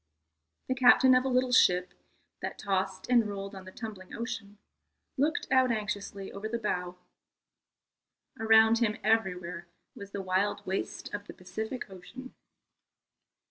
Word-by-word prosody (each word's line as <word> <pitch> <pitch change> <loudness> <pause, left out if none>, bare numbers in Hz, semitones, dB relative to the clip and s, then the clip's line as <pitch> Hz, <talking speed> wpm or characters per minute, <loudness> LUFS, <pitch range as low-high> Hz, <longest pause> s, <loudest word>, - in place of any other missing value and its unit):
The 260 - +1
captain 255 0 +6
of 255 +1 +4
a - - +1
little 255 0 +2
ship, 180 -7 +4 0.5
that - - -4
tossed 190 -1 -2
and 235 -4 +3
rolled 195 0 -5
on 190 -1 -9
the 185 - -10
tumbling 205 -4 -8
ocean, 225 -3 -5 0.6
looked 300 +4 0
out 260 -1 +5
anxiously 205 -2 -4
over 205 +2 -5
the 235 - -1
bow. 180 -5 -3 1.4
Around 225 0 +6
him 220 -3 +1
everywhere 180 -6 0 0.3
was 200 -1 -10
the 200 -1 -5
wild 190 +2 0
waste 190 +1 -4
of 205 0 -5
the - - -8
Pacific 220 +7 -5
Ocean. 245 +8 -11
210 Hz, 140 wpm, -30 LUFS, 190-235 Hz, 1.4 s, captain